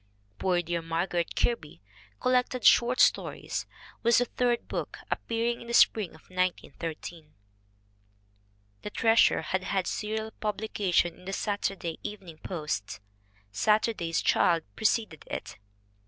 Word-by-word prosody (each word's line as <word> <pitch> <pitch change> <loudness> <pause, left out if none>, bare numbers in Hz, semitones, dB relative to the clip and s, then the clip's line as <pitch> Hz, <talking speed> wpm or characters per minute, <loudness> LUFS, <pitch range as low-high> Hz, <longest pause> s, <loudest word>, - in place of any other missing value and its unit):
Poor 180 -2 +1
Dear 170 0 -2
Margaret 170 +1 -1
Kirby, 160 - -1 0.4
collected 250 0 +1
short 245 +1 +5
stories, - - +1 0.3
was 235 0 +4
the 245 - +4
third 240 0 0
book, - - -4
appearing 235 +1 -1
in 235 - -10
the 235 - 0
spring 205 -7 +4
of 160 - -17
1913. 170 -3 -4 1.5
The - - -5
Treasure 225 +2 +4
had 190 0 -1
had 190 -2 0
serial 220 +2 -3
publication 205 -5 0
in 180 - -16
the 195 - -4
Saturday 195 -5 -2
Evening 185 -6 -8
Post. 150 - -4 0.5
Saturday's 210 - +1
Child 170 -2 +3
preceded 215 -7 0
it. - - -6
195 Hz, 120 wpm, -28 LUFS, 170-225 Hz, 1.5 s, short